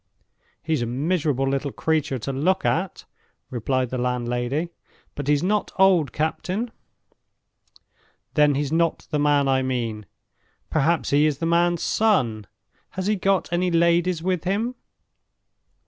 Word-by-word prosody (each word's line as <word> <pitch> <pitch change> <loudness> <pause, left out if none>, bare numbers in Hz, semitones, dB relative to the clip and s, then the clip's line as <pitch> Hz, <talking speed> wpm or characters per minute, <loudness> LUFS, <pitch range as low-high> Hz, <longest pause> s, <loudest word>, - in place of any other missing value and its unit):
"He's 155 -4 0
a 120 - -1
miserable 145 +1 0
little 140 +1 -1
creature 155 -4 -1
to 135 +3 -4
look 185 +8 +1
at," 180 +2 -1 0.5
replied 130 +1 -1
the 130 - -2
landlady; 125 +5 -1 0.4
"but 145 -1 -6
he's 145 +1 +2
not 205 +3 0
old, 185 -8 +4
captain." 185 - -2 1.6
"Then 150 -2 +4
he's 145 0 -1
not 165 0 +1
the 150 - 0
man 145 -1 +3
I 135 -1 +2
mean. 115 -5 -3 0.6
Perhaps 160 +2 +1
he 145 +2 +4
is 150 -3 -1
the 165 - -3
man's 170 0 +2
son? 125 - +1 0.5
Has 185 - -2
he 210 +1 +2
got 195 -2 0
any 180 +1 +1
ladies 170 0 +2
with 180 -3 0
him?" 210 +7 -1
155 Hz, 135 wpm, -23 LUFS, 135-175 Hz, 1.6 s, old